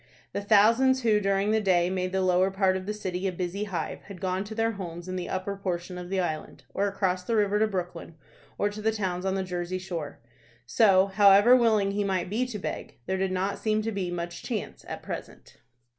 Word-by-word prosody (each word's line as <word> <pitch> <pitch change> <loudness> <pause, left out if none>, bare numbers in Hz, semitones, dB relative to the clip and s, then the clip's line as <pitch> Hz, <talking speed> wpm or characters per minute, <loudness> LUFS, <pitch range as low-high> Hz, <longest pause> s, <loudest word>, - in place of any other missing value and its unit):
The - - -2
thousands 230 +6 +4
who 215 -2 +4
during 195 +1 +1
the 220 0 +2
day 180 -4 +3
made 185 -1 -1
the 190 0 0
lower 185 +1 +3
part 190 -1 +2
of 190 0 -5
the - - 0
city 185 -2 -3
a - - 0
busy 180 +3 -3
hive 175 -6 -4
had 200 -3 -9
gone 185 0 -1
to 220 +1 -8
their 225 0 +1
homes 175 -4 -7
in 185 - -4
the 180 -1 -4
upper 190 +2 -3
portion 180 -2 -4
of 180 0 -8
the 195 0 0
island, 160 -4 -4
or 200 +1 +1
across 190 -2 -1
the 230 +5 -1
river 210 -1 +2
to 220 - +3
Brooklyn 180 -4 -5 0.4
or 205 - +1
the 215 +1 -1
towns 190 -3 -2
on 190 - 0
the 190 - -1
Jersey 180 0 -3
shore. 170 -5 -6 0.5
So, 190 - +5
however 200 +4 +6
willing 220 -5 +3
he 205 +1 -1
might 190 -2 -1
be 245 +4 0
to 235 -4 -5
beg, 195 - -6
there 190 - -1
did 190 0 0
not 190 +2 -1
seem 215 0 0
to 225 - -2
be 195 -4 -2
much 170 -1 -5
chance 225 -5 -5
at - - -6
present. - - -8
195 Hz, 220 wpm, -27 LUFS, 180-210 Hz, 0.5 s, however